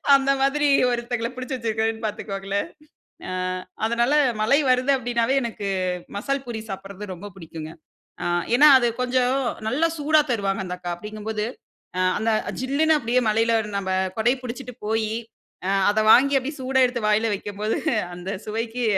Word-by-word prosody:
அந்த 275 0 +3
மாதிரி 290 +2 +2 0.2
ஒருத்தவங்கள 235 -1 -2
பிடிச்சி 255 +1 -4
வச்சிருக்கேன்னு 225 -1 -1
பாத்துக்கோங்களேன். 200 - -3 0.6
ஆ - - -4 0.6
அதனால 235 +3 +1 0.3
மழை 255 +7 +4
வருது 255 +2 +3
அப்டின்னாவே 240 0 0
எனக்கு 215 -3 -4 0.5
மசால் 275 +6 -2
பூரி 235 -3 -5
சாப்டுறது 195 +1 -7
ரொம்ப 190 +3 -9
பிடிக்குங்க. 160 -3 -8 0.5
அ - - -3 0.3
ஏன்னா 300 +3 +8
அது 240 -2 +2
கொஞ்சம் 250 0 +2 0.3
நல்லா 310 +7 +2
சூடா 305 +1 +4
தருவாங்க 195 -3 -1
அந்த 180 0 -5
அக்கா. 175 -1 -4
அப்டிங்கும்போது 210 +3 -4 0.5
ஆ - - 0 0.2
அந்த 225 - 0 0.3
ஜில்லுனு 285 +5 +2
அப்டியே 245 0 +1
மழைல, 225 +2 +2 0.3
நம்ம 190 -1 -3 0.3
குடை 240 +3 +4
பிடிச்சுட்டு 250 0 -7
போயி 220 0 0 0.6
அ - - +1 0.2
அத 210 +1 +2
வாங்கி 280 +2 +6
அப்டியே 285 +4 -6
சூடா 265 +1 +1
எடுத்து 245 -1 -2
வாய்ல 215 +2 +3
வெக்கும்போது, 205 +2 -3 0.4
அந்த 180 +2 -7 0.2
சுவைக்கு 225 +3 -3
230 Hz, 145 wpm, -23 LUFS, 210-255 Hz, 0.6 s, ஏன்னா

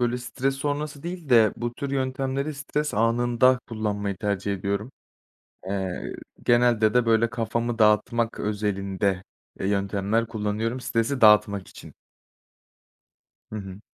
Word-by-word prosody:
böyle, 120 0 +1
stres 135 +2 -2
sonrası 145 +1 -3
değil 175 -3 -6
de 115 -4 +6
bu 120 0 -3
tür 140 -2 -4
yöntemleri 135 +2 -2
stres 150 +1 -2
anında 120 +3 +3
kullanmayı 105 -3 -2
tercih 100 0 -2
ediyorum. 100 +5 -3 0.7
Eee, 95 -2 -3 0.3
genelde 120 -3 +4
de, 125 -1 +3
böyle, 115 0 +3
kafamı 115 0 -2
dağıtmak 115 +2 +2
özelinde, 100 -2 -1 0.4
eee, - - -1
yöntemler 100 +3 0
kullanıyorum 110 +3 -2
stresi 125 +3 -1
dağıtmak 105 -3 +5
için. - - -13 1.6
Hı - - -4
hı. 95 -1 -7
115 Hz, 120 wpm, -25 LUFS, 105-125 Hz, 1.6 s, de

